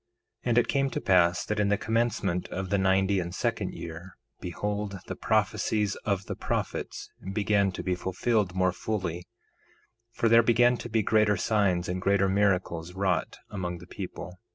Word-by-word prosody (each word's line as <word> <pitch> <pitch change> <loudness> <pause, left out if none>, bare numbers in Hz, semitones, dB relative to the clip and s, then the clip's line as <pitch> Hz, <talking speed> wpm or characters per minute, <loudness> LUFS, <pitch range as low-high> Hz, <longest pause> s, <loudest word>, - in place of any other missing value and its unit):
1:4 - - 0
And 120 - +2
it 120 - +4
came 135 -1 +1
to - - -3
pass 90 -2 +3
that 105 - -2
in 105 -1 +2
the 100 - +3
commencement 110 -5 0
of 95 +1 -5
the 100 - +3
ninety 95 +1 +3
and 85 0 -4
second - - -1
year, 85 +2 -8 0.2
behold, 100 +3 -3
the - - -5
prophecies 105 -1 +1
of 100 -2 -2
the - - -4
prophets - - -3 0.2
began 100 -1 +2
to - - -6
be 95 - 0
fulfilled 95 +2 0
more 95 0 +3
fully; 90 -3 -3 0.8
for 115 - 0
there 115 +1 +7
began 120 +2 +4
to 120 - -7
be 110 -1 +1
greater 105 -1 +3
signs 95 -5 +1
and 90 +1 -3
greater 100 +1 +3
miracles 95 -4 0
wrought 95 -3 -1
among 90 -4 -3
the 85 - -12
people. 90 0 -8
100 Hz, 175 wpm, -28 LUFS, 90-105 Hz, 0.8 s, there